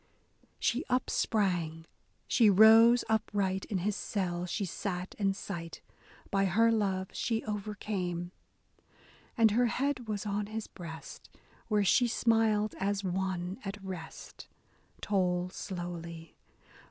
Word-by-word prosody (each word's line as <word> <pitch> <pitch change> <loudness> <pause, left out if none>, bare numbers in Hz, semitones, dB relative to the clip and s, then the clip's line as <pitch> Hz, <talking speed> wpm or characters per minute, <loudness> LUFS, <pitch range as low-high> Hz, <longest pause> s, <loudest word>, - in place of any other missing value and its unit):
She 250 +6 0
upsprang, 180 -10 0 0.4
she 230 -4 +5
rose 225 +4 +7
upright, 200 -3 0
— - - -23
in 200 - 0
his 200 +3 -1
selle 180 -5 -2
she 200 +3 -2
sate 185 0 -4
in 195 -1 +1
sight, 170 -4 -7 0.5
By 195 0 +2
her 225 +5 +4
love 195 -4 0
she 225 -1 -1
overcame, 200 -4 -3 1.1
And 225 -2 +5
her 240 +3 +3
head 255 0 -1
was 210 -1 -3
on 205 0 -2
his 220 0 -4
breast, 160 -3 -10 0.4
where 210 -2 +2
she 245 +6 +4
smiled 225 -2 +2
as 200 0 -1
one 185 +1 -2
at 195 0 -5
rest, 180 -4 -8 0.3
— - - -33
Toll 180 -3 0
slowly. 170 -4 -7
200 Hz, 125 wpm, -31 LUFS, 180-220 Hz, 1.1 s, rose